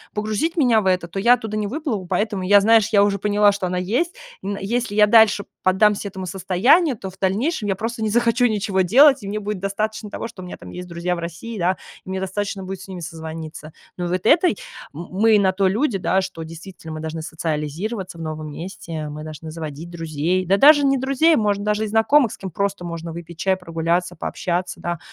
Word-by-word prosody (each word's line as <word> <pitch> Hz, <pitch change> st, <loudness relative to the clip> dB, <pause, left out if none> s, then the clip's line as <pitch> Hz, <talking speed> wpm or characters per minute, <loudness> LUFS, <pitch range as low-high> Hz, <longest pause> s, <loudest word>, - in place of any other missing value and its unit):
погрузить 215 Hz, -, -1 dB
меня 245 Hz, -7 st, +4 dB
в 190 Hz, -, -2 dB
это, 180 Hz, -2 st, +1 dB
то 185 Hz, +3 st, -5 dB
я 235 Hz, +5 st, +6 dB
оттуда 220 Hz, -3 st, -5 dB
не 210 Hz, -1 st, -1 dB
выплыву, 235 Hz, -, -3 dB
поэтому 200 Hz, +2 st, -1 dB
я, 205 Hz, +2 st, +6 dB
знаешь, 220 Hz, +1 st, +4 dB
я 200 Hz, -2 st, +5 dB
уже 200 Hz, -1 st, +1 dB
поняла, 205 Hz, +1 st, +3 dB
что 200 Hz, -2 st, -3 dB
она 180 Hz, 0 st, -2 dB
есть. 240 Hz, -, -1 dB, 0.3 s
И 195 Hz, -, -7 dB
н 200 Hz, -, -2 dB
если 225 Hz, +1 st, -2 dB
я 210 Hz, 0 st, +6 dB
дальше 210 Hz, -1 st, +5 dB, 0.2 s
поддамся 200 Hz, +2 st, +3 dB
этому 190 Hz, -1 st, -6 dB
состоянию, 195 Hz, -, +2 dB
то 190 Hz, -2 st, -7 dB
в 190 Hz, -, -20 dB
дальнейшем 210 Hz, -, 0 dB
я 195 Hz, -, +1 dB
просто 225 Hz, +3 st, -4 dB
не 220 Hz, -, 0 dB
захочу 240 Hz, +2 st, +3 dB
ничего 200 Hz, -3 st, 0 dB
делать, 270 Hz, -, +6 dB
и 200 Hz, -, -7 dB
мне 210 Hz, +2 st, -2 dB
будет 210 Hz, -1 st, -4 dB
достаточно 210 Hz, +2 st, -3 dB
того, 220 Hz, -, -5 dB
что 230 Hz, -5 st, -11 dB
у -, -, -8 dB
меня 180 Hz, -, -8 dB
там -, -, -11 dB
есть 180 Hz, 0 st, -7 dB
друзья 175 Hz, +1 st, -2 dB
в -, -, -6 dB
России, 175 Hz, +7 st, -6 dB
да, 180 Hz, +2 st, +1 dB, 0.3 s
и -, -, -12 dB
мне 190 Hz, 0 st, -2 dB
достаточно 195 Hz, +1 st, -3 dB
будет 190 Hz, 0 st, -6 dB
с 195 Hz, -, -11 dB
ними 185 Hz, -2 st, -7 dB
созвониться. 160 Hz, -1 st, -8 dB, 0.2 s
Но 175 Hz, -, -2 dB
вот 180 Hz, +1 st, 0 dB
этой 335 Hz, +8 st, +4 dB, 0.4 s
м-мы 200 Hz, +7 st, +2 dB
на 190 Hz, -2 st, +3 dB
то 190 Hz, 0 st, +1 dB
люди, 210 Hz, +1 st, 0 dB
да, 190 Hz, +1 st, +1 dB
что 185 Hz, -3 st, -7 dB
действительно, 165 Hz, 0 st, -9 dB
мы 155 Hz, -, -6 dB
должны 160 Hz, +1 st, -5 dB
социализироваться 165 Hz, +5 st, -4 dB
в -, -, -8 dB
новом 155 Hz, -1 st, -5 dB
месте, 165 Hz, -2 st, -6 dB
мы 150 Hz, +1 st, -7 dB
должны 155 Hz, 0 st, -8 dB
заводить 160 Hz, +1 st, -7 dB
друзей, 165 Hz, +2 st, -1 dB
да 195 Hz, -, +4 dB
даже 290 Hz, +5 st, +8 dB
не 275 Hz, -1 st, +3 dB
друзей, 275 Hz, +5 st, +3 dB
может, 205 Hz, -2 st, +1 dB
даже 210 Hz, +1 st, 0 dB
и 220 Hz, -, -2 dB
знакомых, 225 Hz, +3 st, +3 dB
с -, -, -8 dB
кем 190 Hz, -, -6 dB
просто 200 Hz, 0 st, -2 dB
можно 170 Hz, -1 st, -5 dB
выпить 170 Hz, 0 st, -9 dB
чай, 190 Hz, 0 st, +1 dB
прогуляться, 170 Hz, 0 st, -1 dB
пообщаться, 180 Hz, +2 st, -3 dB
да, 175 Hz, -1 st, -3 dB
195 Hz, 220 wpm, -21 LUFS, 175-215 Hz, 0.4 s, даже